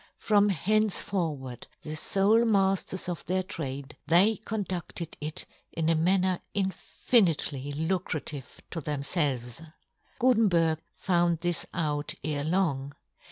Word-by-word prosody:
From 205 Hz, -1 st, +3 dB
henceforward 175 Hz, -, -1 dB, 0.2 s
the 155 Hz, 0 st, -5 dB
fole 200 Hz, +8 st, +3 dB
mafters 195 Hz, -4 st, +1 dB
of 175 Hz, -2 st, -4 dB
their 185 Hz, +2 st, +1 dB
trade, 140 Hz, -6 st, -6 dB
they 190 Hz, +7 st, +5 dB
conducted 185 Hz, -6 st, -4 dB
it 150 Hz, +1 st, -2 dB, 0.3 s
in 160 Hz, -1 st, 0 dB
a 165 Hz, -, +4 dB
manner 185 Hz, +2 st, +2 dB, 0.2 s
infinitely 180 Hz, -, +1 dB
lucrative 160 Hz, -4 st, -3 dB
to 165 Hz, -, -3 dB
themf 145 Hz, +2 st, -3 dB
elves. 130 Hz, -5 st, 0 dB, 0.6 s
Gutenberg 195 Hz, -11 st, +3 dB, 0.2 s
found 170 Hz, -2 st, +1 dB
this 175 Hz, -1 st, 0 dB
out 150 Hz, -3 st, -1 dB
ere 145 Hz, -1 st, -1 dB
long. 145 Hz, -5 st, 0 dB
170 Hz, 115 wpm, -28 LUFS, 150-195 Hz, 0.6 s, they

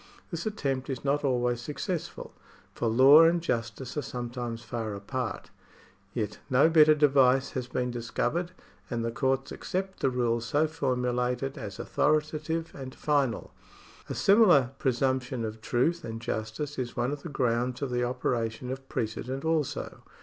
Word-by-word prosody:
This 170 Hz, +3 st, -3 dB
attempt 135 Hz, -11 st, -2 dB
is 130 Hz, 0 st, -4 dB
not 145 Hz, +2 st, +1 dB
always 125 Hz, -3 st, +1 dB
successful, 150 Hz, +6 st, -5 dB, 0.4 s
for 115 Hz, -, -2 dB
law 130 Hz, +7 st, +8 dB
and 170 Hz, +1 st, +4 dB
justice 120 Hz, -4 st, -3 dB
are 150 Hz, -, 0 dB
sometimes 120 Hz, -2 st, -5 dB
far 110 Hz, -2 st, -4 dB
apart; 120 Hz, +4 st, -4 dB, 0.6 s
yet 105 Hz, -3 st, -3 dB
no 130 Hz, +5 st, +5 dB
better 155 Hz, -1 st, +7 dB
device 135 Hz, -3 st, +4 dB
has 125 Hz, -2 st, -4 dB
been 125 Hz, 0 st, -2 dB
discovered, 125 Hz, +9 st, -2 dB, 0.4 s
and 115 Hz, -2 st, -2 dB
the 115 Hz, -, -1 dB
courts 135 Hz, +2 st, 0 dB
accept 190 Hz, +1 st, -4 dB
the 135 Hz, -, +2 dB
rules 120 Hz, -2 st, 0 dB
so 145 Hz, +5 st, +2 dB
formulated 125 Hz, -3 st, -1 dB
as 105 Hz, -8 st, -7 dB
authoritative 155 Hz, +2 st, 0 dB
and 130 Hz, -1 st, -8 dB
final. 140 Hz, -6 st, 0 dB, 0.6 s
A -, -, -3 dB
similar 180 Hz, -, +5 dB
presumption 130 Hz, -1 st, 0 dB
of 110 Hz, 0 st, -6 dB
truth 160 Hz, +10 st, +1 dB
and 115 Hz, -3 st, -5 dB
justice 115 Hz, +6 st, -4 dB
is 120 Hz, -2 st, -4 dB
one 120 Hz, +2 st, 0 dB
of 145 Hz, -1 st, -5 dB
the 170 Hz, -, -7 dB
grounds 125 Hz, -1 st, 0 dB
of 135 Hz, -, -2 dB
the 125 Hz, 0 st, 0 dB
operation 120 Hz, -1 st, -2 dB
of 135 Hz, 0 st, -7 dB
precedent 125 Hz, +5 st, -3 dB
also. 160 Hz, -3 st, -1 dB
130 Hz, 150 wpm, -28 LUFS, 120-145 Hz, 0.6 s, law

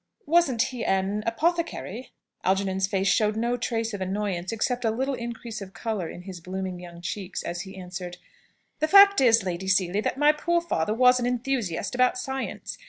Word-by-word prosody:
Wasn't 290 Hz, -8 st, +3 dB
he 250 Hz, -3 st, -4 dB
an 195 Hz, +2 st, 0 dB
apothecary?" 260 Hz, -, -1 dB, 0.3 s
Algernon's 190 Hz, 0 st, +1 dB
face 195 Hz, -1 st, 0 dB
showed 210 Hz, +1 st, +3 dB
no 235 Hz, +2 st, 0 dB
trace 230 Hz, -2 st, -2 dB
of 200 Hz, -, -5 dB
annoyance, 190 Hz, -2 st, -2 dB
except 245 Hz, +2 st, -1 dB
a 225 Hz, -, +2 dB
little 265 Hz, +5 st, -1 dB
increase 235 Hz, -2 st, -6 dB
of 190 Hz, -1 st, -9 dB
colour 210 Hz, -8 st, -3 dB
in 175 Hz, -, -9 dB
his 180 Hz, -2 st, -8 dB
blooming 185 Hz, 0 st, -5 dB
young 175 Hz, -1 st, -11 dB
cheeks, 190 Hz, +1 st, -5 dB
as 175 Hz, 0 st, -4 dB
he 190 Hz, 0 st, -10 dB
answered, 180 Hz, -1 st, -7 dB, 0.6 s
"The 310 Hz, -, +2 dB
fact 400 Hz, 0 st, +8 dB
is, 230 Hz, -4 st, +5 dB
Lady 185 Hz, 0 st, -4 dB
Seely, 190 Hz, +1 st, +2 dB
that 255 Hz, -, -2 dB
my 295 Hz, +1 st, +6 dB
poor 340 Hz, +3 st, 0 dB
father 215 Hz, -, -1 dB
was 250 Hz, +1 st, +5 dB
an 240 Hz, -, 0 dB
enthusiast 240 Hz, -7 st, -2 dB
about 255 Hz, 0 st, +3 dB
science. 265 Hz, +1 st, -5 dB
215 Hz, 180 wpm, -26 LUFS, 190-250 Hz, 0.6 s, fact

